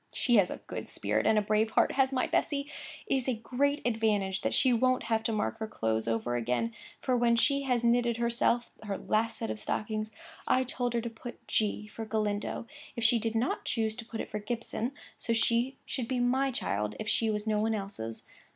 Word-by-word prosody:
She 240 Hz, -3 st, +3 dB
has 195 Hz, -3 st, +4 dB
a -, -, -5 dB
good -, -, -6 dB
spirit -, -, 0 dB
and 215 Hz, -, +4 dB
a 210 Hz, -, +3 dB
brave 215 Hz, +1 st, +2 dB
heart, -, -, +3 dB
has 265 Hz, 0 st, +2 dB
my 260 Hz, -1 st, +1 dB
Bessy! 280 Hz, -1 st, 0 dB, 0.4 s
It -, -, 0 dB
is 260 Hz, -, -3 dB
a 250 Hz, -, +1 dB
great 275 Hz, +6 st, 0 dB
advantage 215 Hz, -5 st, +1 dB
that -, -, 0 dB
she 260 Hz, -3 st, +4 dB
won't 255 Hz, +2 st, +2 dB
have 225 Hz, -1 st, +1 dB
to 225 Hz, -, -1 dB
mark 215 Hz, +1 st, -1 dB
her 220 Hz, -, -3 dB
clothes 110 Hz, -, -1 dB
over 115 Hz, +1 st, 0 dB
again: 125 Hz, -, 0 dB, 0.3 s
for 255 Hz, -, +1 dB
when 240 Hz, -1 st, +4 dB
she 280 Hz, +4 st, +3 dB
had 250 Hz, -3 st, 0 dB
knitted 235 Hz, 0 st, +3 dB
herself 235 Hz, 0 st, +1 dB
her 205 Hz, -2 st, -3 dB
last 225 Hz, +1 st, 0 dB
set 225 Hz, -, -3 dB
of -, -, -5 dB
stockings, 215 Hz, 0 st, -2 dB, 0.4 s
I 260 Hz, -, +4 dB
told 245 Hz, -1 st, -1 dB
her 235 Hz, -, +2 dB
to 235 Hz, -, -4 dB
put 240 Hz, +2 st, -10 dB
G 210 Hz, -1 st, 0 dB
for 220 Hz, +1 st, -7 dB
Galindo, 215 Hz, 0 st, -1 dB, 0.3 s
if 235 Hz, -, -3 dB
she 230 Hz, +1 st, +6 dB
did 225 Hz, 0 st, -2 dB
not 235 Hz, +4 st, 0 dB
choose 220 Hz, -2 st, 0 dB
to -, -, -5 dB
put 225 Hz, -1 st, -6 dB
it -, -, -8 dB
for 210 Hz, -, -2 dB
Gibson, 230 Hz, +2 st, -3 dB, 0.3 s
for 230 Hz, -, 0 dB
she 235 Hz, +3 st, +2 dB
should 250 Hz, -4 st, -3 dB
be 255 Hz, -, -1 dB
my 260 Hz, +3 st, +2 dB
child 105 Hz, -, -1 dB
if 215 Hz, -, -4 dB
she 225 Hz, 0 st, +3 dB
was 210 Hz, 0 st, -1 dB
no 215 Hz, -1 st, +1 dB
one 220 Hz, +1 st, +1 dB
else's. 195 Hz, -, -5 dB
225 Hz, 220 wpm, -30 LUFS, 215-245 Hz, 0.4 s, she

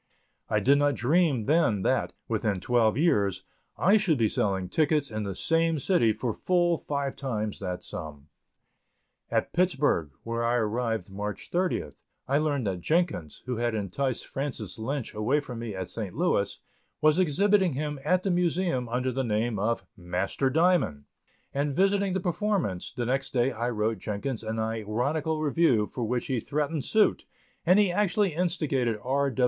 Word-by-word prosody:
I 105 Hz, -, +2 dB
did 140 Hz, +7 st, +4 dB
not 145 Hz, 0 st, +2 dB
dream 140 Hz, -2 st, +2 dB
then 145 Hz, -, +2 dB
that, -, -, +1 dB, 0.2 s
within 105 Hz, -4 st, 0 dB
twelve 115 Hz, +2 st, +2 dB
years, 100 Hz, -, +2 dB, 0.3 s
I 200 Hz, +4 st, +5 dB
should 180 Hz, -8 st, +2 dB
be 115 Hz, -3 st, +2 dB
selling 95 Hz, -2 st, 0 dB
tickets 150 Hz, -, +1 dB
in 110 Hz, -1 st, -3 dB
the 100 Hz, -2 st, -4 dB
same 165 Hz, -, +2 dB
city 135 Hz, -, +3 dB
for 110 Hz, +2 st, -2 dB
full 175 Hz, -, +1 dB
five 140 Hz, -2 st, -3 dB
times 110 Hz, -6 st, -3 dB
that 90 Hz, -2 st, -4 dB
sum. 75 Hz, -2 st, -7 dB, 1.0 s
At -, -, -1 dB
Pittsburg, 145 Hz, -, +2 dB
where 115 Hz, 0 st, -2 dB
I 120 Hz, +1 st, +2 dB
arrived 110 Hz, -3 st, -1 dB
March 105 Hz, +1 st, -5 dB
30th, 180 Hz, +1 st, -1 dB, 0.3 s
I 140 Hz, +2 st, +2 dB
learned 145 Hz, -5 st, 0 dB
that 95 Hz, -3 st, -2 dB
Jenkins, 155 Hz, -, -1 dB
who 125 Hz, -2 st, -2 dB
had 120 Hz, -1 st, 0 dB
enticed 115 Hz, +6 st, -2 dB
Francis 125 Hz, -7 st, -5 dB
Lynch 130 Hz, +3 st, -3 dB
away 110 Hz, +8 st, +1 dB
from 125 Hz, -5 st, -7 dB
me 115 Hz, -4 st, -5 dB
at 95 Hz, -1 st, -4 dB
St. 100 Hz, 0 st, -5 dB
Louis, 155 Hz, -, 0 dB, 0.4 s
was 155 Hz, +3 st, +4 dB
exhibiting 190 Hz, +1 st, +3 dB
him 150 Hz, +1 st, -3 dB
at 185 Hz, +5 st, +2 dB
the 195 Hz, -, +1 dB
Museum 175 Hz, -7 st, 0 dB
under 125 Hz, +2 st, 0 dB
the 135 Hz, +2 st, -1 dB
name 110 Hz, -1 st, 0 dB
of 115 Hz, +4 st, -1 dB
"Master 95 Hz, +7 st, -1 dB
Diamond," 160 Hz, -, +2 dB, 0.5 s
and 140 Hz, 0 st, -1 dB
visiting 195 Hz, +1 st, +2 dB
the 190 Hz, -, 0 dB
performance, 180 Hz, -, -1 dB
the 120 Hz, -, -3 dB
next 135 Hz, +3 st, -1 dB
day 125 Hz, +1 st, +2 dB
I 120 Hz, 0 st, -2 dB
wrote 110 Hz, -2 st, -1 dB
Jenkins 110 Hz, +5 st, -3 dB
an 110 Hz, 0 st, -3 dB
ironical 120 Hz, +9 st, -1 dB
review 145 Hz, -8 st, +3 dB
for 125 Hz, -, -3 dB
which 120 Hz, +2 st, -1 dB
he 130 Hz, -3 st, -1 dB
threatened 150 Hz, +2 st, -2 dB
suit 215 Hz, -1 st, +2 dB, 0.4 s
and 180 Hz, +3 st, +6 dB
he 205 Hz, -3 st, +4 dB
actually 205 Hz, -1 st, +1 dB
instigated 150 Hz, -, 0 dB
R. 140 Hz, +2 st, +1 dB
130 Hz, 165 wpm, -27 LUFS, 110-160 Hz, 1.0 s, and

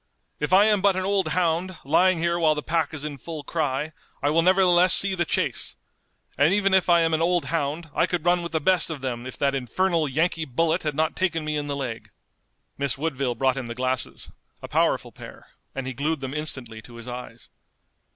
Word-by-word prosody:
If 150 Hz, -, -2 dB
I 195 Hz, +3 st, +7 dB
am 210 Hz, -2 st, +3 dB
but 200 Hz, -1 st, +3 dB
an 185 Hz, 0 st, -2 dB
old 195 Hz, -1 st, +1 dB
hound, 175 Hz, +1 st, 0 dB
lying 185 Hz, +6 st, +4 dB
here 170 Hz, +1 st, 0 dB
while 155 Hz, -2 st, +3 dB
the 150 Hz, -, -4 dB
pack 160 Hz, -2 st, 0 dB
is 155 Hz, -2 st, -6 dB
in 145 Hz, -2 st, -6 dB
full 160 Hz, +1 st, -7 dB
cry, 150 Hz, -1 st, -2 dB, 0.3 s
I 145 Hz, -, +2 dB
will 165 Hz, +2 st, +3 dB
nevertheless 180 Hz, 0 st, +5 dB
see 195 Hz, -1 st, +3 dB
the 175 Hz, -2 st, 0 dB
chase! -, -, -1 dB, 0.6 s
And 155 Hz, +7 st, +4 dB
even 195 Hz, -2 st, +2 dB
if 190 Hz, -1 st, +3 dB
I 170 Hz, -1 st, +6 dB
am 165 Hz, 0 st, +1 dB
an 160 Hz, -, +1 dB
old 175 Hz, -1 st, +1 dB
hound 160 Hz, +1 st, -2 dB
I -, -, +2 dB
could 175 Hz, -2 st, -3 dB
run 175 Hz, 0 st, +3 dB
with 170 Hz, -, -6 dB
the 160 Hz, -, +1 dB
best 180 Hz, +3 st, +2 dB
of 155 Hz, -4 st, -5 dB
them 125 Hz, -2 st, -4 dB
if 130 Hz, -, -8 dB
that 140 Hz, -1 st, +1 dB
infernal 160 Hz, +6 st, 0 dB
Yankee 160 Hz, +3 st, 0 dB
bullet 165 Hz, +6 st, 0 dB
had 150 Hz, -2 st, -3 dB
not 160 Hz, +1 st, 0 dB
taken 165 Hz, -4 st, -1 dB
me 155 Hz, 0 st, -2 dB
in 145 Hz, -1 st, -2 dB
the 140 Hz, -, -2 dB
leg!" 125 Hz, -5 st, -5 dB, 0.7 s
Miss 140 Hz, -2 st, -1 dB
Woodville 135 Hz, -4 st, -2 dB
brought 130 Hz, +2 st, +1 dB
him 130 Hz, -3 st, -4 dB
the 115 Hz, -, -6 dB
glasses, 130 Hz, 0 st, -3 dB, 0.3 s
a -, -, -5 dB
powerful -, -, +1 dB
pair, -, -, -13 dB, 0.3 s
and 135 Hz, -1 st, -4 dB
he 130 Hz, -, -4 dB
glued 150 Hz, +4 st, -1 dB
them 135 Hz, 0 st, -4 dB
instantly 130 Hz, -7 st, -5 dB
to 120 Hz, +2 st, -14 dB
his 115 Hz, 0 st, -10 dB
eyes. 120 Hz, -2 st, -8 dB
155 Hz, 220 wpm, -24 LUFS, 135-175 Hz, 0.7 s, I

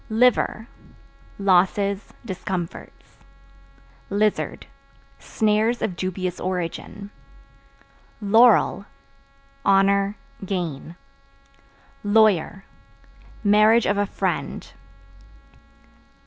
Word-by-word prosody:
Liver 225 Hz, -1 st, +2 dB, 0.7 s
Losses, 195 Hz, +1 st, +1 dB
discomforts. 185 Hz, -4 st, -7 dB, 0.9 s
Lizard 210 Hz, +1 st, -1 dB, 0.5 s
Snares 220 Hz, +2 st, 0 dB
of 185 Hz, -, -2 dB
dubious 185 Hz, 0 st, -4 dB
origin. 185 Hz, +3 st, -5 dB, 1.1 s
Laurel 225 Hz, +4 st, +4 dB, 0.8 s
Honor, 200 Hz, +1 st, +2 dB, 0.3 s
gain. 175 Hz, -5 st, -4 dB, 1.1 s
Lawyer 205 Hz, -3 st, +2 dB, 0.8 s
Marriage 215 Hz, +2 st, +4 dB
of 205 Hz, 0 st, 0 dB
a 205 Hz, -, 0 dB
friend. 190 Hz, -3 st, -4 dB
200 Hz, 60 wpm, -23 LUFS, 185-215 Hz, 1.1 s, Laurel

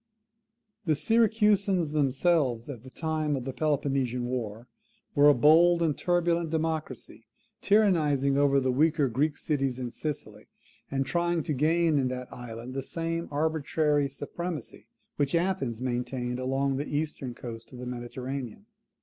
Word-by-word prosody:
The 155 Hz, -3 st, +2 dB
Syracusans 205 Hz, -2 st, +2 dB
themselves, 140 Hz, -3 st, +1 dB
at 120 Hz, -6 st, -9 dB
the 130 Hz, -, -12 dB
time 155 Hz, 0 st, -1 dB
of 130 Hz, -2 st, -4 dB
the 135 Hz, -, -4 dB
Peloponnesian 135 Hz, -5 st, 0 dB
war, 120 Hz, -2 st, -4 dB, 0.5 s
were 145 Hz, +1 st, +6 dB
a 145 Hz, -, +6 dB
bold 170 Hz, +6 st, +5 dB
and 155 Hz, -3 st, +1 dB
turbulent 170 Hz, -1 st, +1 dB
democracy, 160 Hz, 0 st, -3 dB, 0.3 s
tyrannizing 155 Hz, -10 st, +3 dB
over 140 Hz, -1 st, +4 dB
the 130 Hz, -1 st, +1 dB
weaker 150 Hz, +1 st, +3 dB
Greek 145 Hz, +5 st, 0 dB
cities 135 Hz, -4 st, -1 dB
in 125 Hz, -2 st, -4 dB
Sicily, 150 Hz, +4 st, -6 dB, 0.4 s
and 135 Hz, 0 st, -1 dB
trying 170 Hz, 0 st, 0 dB
to 150 Hz, -, -2 dB
gain 160 Hz, +2 st, +2 dB
in 130 Hz, -, +1 dB
that 125 Hz, 0 st, -5 dB
island 120 Hz, +1 st, -8 dB
the 135 Hz, -, -2 dB
same 165 Hz, +4 st, -3 dB
arbitrary 150 Hz, -1 st, +1 dB
supremacy 150 Hz, +1 st, -6 dB, 0.3 s
which 145 Hz, +2 st, +1 dB
Athens 165 Hz, -10 st, -1 dB
maintained 125 Hz, 0 st, -2 dB
along 135 Hz, +1 st, 0 dB
the 145 Hz, -, -3 dB
eastern 145 Hz, -5 st, -4 dB
coast 115 Hz, -1 st, -9 dB
of 125 Hz, -, -10 dB
the 125 Hz, -, -7 dB
Mediterranean. 125 Hz, 0 st, -6 dB
145 Hz, 140 wpm, -28 LUFS, 130-160 Hz, 0.5 s, were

